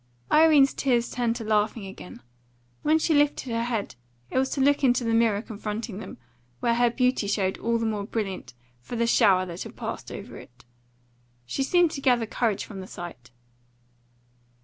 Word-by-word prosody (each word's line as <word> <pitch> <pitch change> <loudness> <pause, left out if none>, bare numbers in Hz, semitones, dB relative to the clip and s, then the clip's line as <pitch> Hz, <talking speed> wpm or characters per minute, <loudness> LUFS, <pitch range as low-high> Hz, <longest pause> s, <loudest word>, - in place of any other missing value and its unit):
Irene's 305 -3 +6
tears 245 -3 0
turned 240 -2 0
to 235 - -5
laughing 215 0 0
again. 190 -1 -11 0.6
When 310 +1 +3
she 320 0 +1
lifted 290 -3 +2
her 230 0 0
head 230 -4 -2 0.4
it - - +1
was 265 0 +1
to - - -3
look 285 +1 +3
into 245 -1 +3
the 230 -1 0
mirror 225 -2 +2
confronting 215 -1 -5
them, - - -9 0.4
where 235 - +1
her 240 +1 +3
beauty 250 -3 +1
showed 195 -2 0
all 230 0 0
the 230 - -2
more 210 -2 -2
brilliant 190 - -4 0.2
for 120 - -8
the 235 0 +1
shower 195 -6 +4
that 175 -1 -7
had - - -7
passed - - -6
over - - -8
it. 125 +1 -15 0.8
She 125 - -3
seemed 345 +4 +3
to 275 - -5
gather 245 -4 +3
courage 220 -2 -1
from 200 -3 -9
the 190 - -8
sight. 130 -11 -9
230 Hz, 180 wpm, -26 LUFS, 205-255 Hz, 0.8 s, Irene's